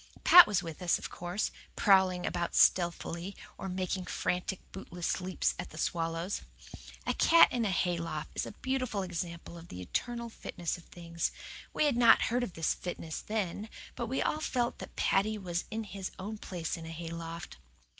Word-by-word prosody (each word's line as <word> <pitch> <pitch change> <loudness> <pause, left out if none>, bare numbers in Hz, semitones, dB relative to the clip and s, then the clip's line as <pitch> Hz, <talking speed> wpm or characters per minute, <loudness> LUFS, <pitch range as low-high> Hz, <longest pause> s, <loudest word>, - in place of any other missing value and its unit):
Pat 355 0 +11
was 200 -3 +1
with 165 +1 -7
us, 175 -1 +3
of - - -7
course, 175 +4 -2 0.2
prowling 190 -3 +4
about 175 -1 -2
stealthily, 175 +1 +2 0.2
or 195 - -5
making 185 0 -2
frantic, 180 +2 -1
bootless 180 -1 -3
leaps 185 0 0
at - - -5
the 155 - -12
swallows. 165 +3 -1 0.6
A - - +1
cat 335 - +7
in 240 -2 +1
a - - +1
hayloft 170 -4 -1
is - - -2
a - - -6
beautiful 255 -3 -2
example 170 -1 -5
of 165 - -12
the 90 - -8
eternal 235 - -3
fitness 175 -5 -4
of 175 - -13
things. 170 -1 -3 0.4
We - - +2
had 280 -5 +2
not 235 -2 +7
heard 245 - +2
of 240 -8 -3
this 160 -1 +1
fitness 165 -3 -5
then, 210 0 -3 0.3
but 240 -2 -3
we 260 +4 0
all 305 - 0
felt 245 -5 -1
that - - -9
Paddy 215 +3 +2
was 175 -3 -3
in 225 0 -3
his 195 -2 -5
own 210 +3 -5
place 170 -5 -4
in 165 -1 -8
a - - -6
hayloft. 165 0 -6
180 Hz, 180 wpm, -31 LUFS, 170-215 Hz, 0.6 s, Pat